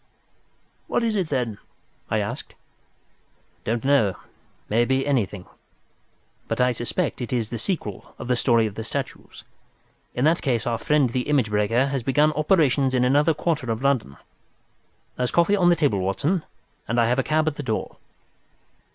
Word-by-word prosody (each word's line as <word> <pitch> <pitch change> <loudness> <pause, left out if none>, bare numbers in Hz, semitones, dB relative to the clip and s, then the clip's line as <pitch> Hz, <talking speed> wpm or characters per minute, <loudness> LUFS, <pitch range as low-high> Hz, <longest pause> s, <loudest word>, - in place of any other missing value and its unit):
"What 240 - 0
is 225 -2 0
it, 185 -6 -1
then?" 120 -7 -2 0.5
I - - +1
asked. - - -4 1.1
"Don't 115 +3 -2
know—may 115 -2 0
be 130 +2 +1
anything. 105 -9 -1 1.0
But - - -2
I 125 0 +4
suspect 130 +6 -2
it 120 - -4
is 115 -4 -1
the 120 - -3
sequel 110 - -4
of - - -7
the 125 - +2
story 115 -2 +3
of 105 - -3
the 110 - -5
statues. - - -6 0.7
In 125 - +1
that 165 +2 +3
case 120 -5 0
our 115 -2 -1
friend 140 +1 +2
the 125 +3 -2
image 130 -8 +2
breaker 105 +5 +2
has 135 -2 -2
begun 145 +5 +3
operations 150 -5 +2
in 125 0 +3
another 145 +5 +3
quarter 150 -5 -1
of 115 +3 -3
London. 130 - 0 1.0
There's 125 -1 0
coffee 170 +4 +3
on 180 -3 +4
the 175 - +5
table, 145 - +1
Watson, 145 - 0 0.4
and 115 +2 0
I 115 - +4
have 120 +2 +1
a - - +2
cab 155 0 +1
at 155 - +1
the - - -3
door." 110 -6 -3
130 Hz, 170 wpm, -24 LUFS, 115-150 Hz, 1.1 s, the